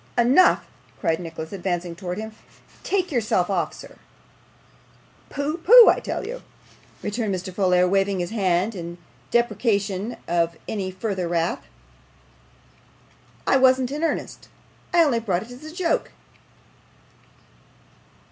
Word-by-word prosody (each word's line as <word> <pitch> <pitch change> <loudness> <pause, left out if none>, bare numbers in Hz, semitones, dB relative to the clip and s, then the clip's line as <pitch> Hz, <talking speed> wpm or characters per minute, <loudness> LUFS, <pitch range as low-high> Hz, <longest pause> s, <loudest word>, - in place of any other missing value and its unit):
'Enough!' 255 +10 +5 0.3
cried 165 -3 0
Nicholas, 165 -1 -7
advancing 175 -2 -3
towards 180 +1 -5
him. 220 0 -6 0.5
'Take 370 -3 -1
yourself 210 -7 +1
off, 170 -5 0
sir.' - - -13 1.3
'Pooh! 295 +4 -3
pooh! 460 +7 +9
I - - +3
tell - - -4
you,' - - -6 0.6
returned 210 -1 -2
Mr. 185 +1 -6
Folair, 180 -1 +3
waving 195 0 +1
his 175 +2 -3
hand 195 -1 +1
in 170 -2 -7 0.3
deprecation 215 -2 0
of 170 -1 0
any 195 -3 -3
further 185 -1 -3
wrath; 170 0 -1 1.8
'I - - +4
wasn't 260 -1 +3
in 300 +3 -3
earnest. 330 - -3 0.4
I 345 -1 +5
only 265 -7 +2
brought 190 -5 -1
it 235 - -14
in 310 +6 -10
joke. 350 -2 0
200 Hz, 120 wpm, -23 LUFS, 180-255 Hz, 1.8 s, pooh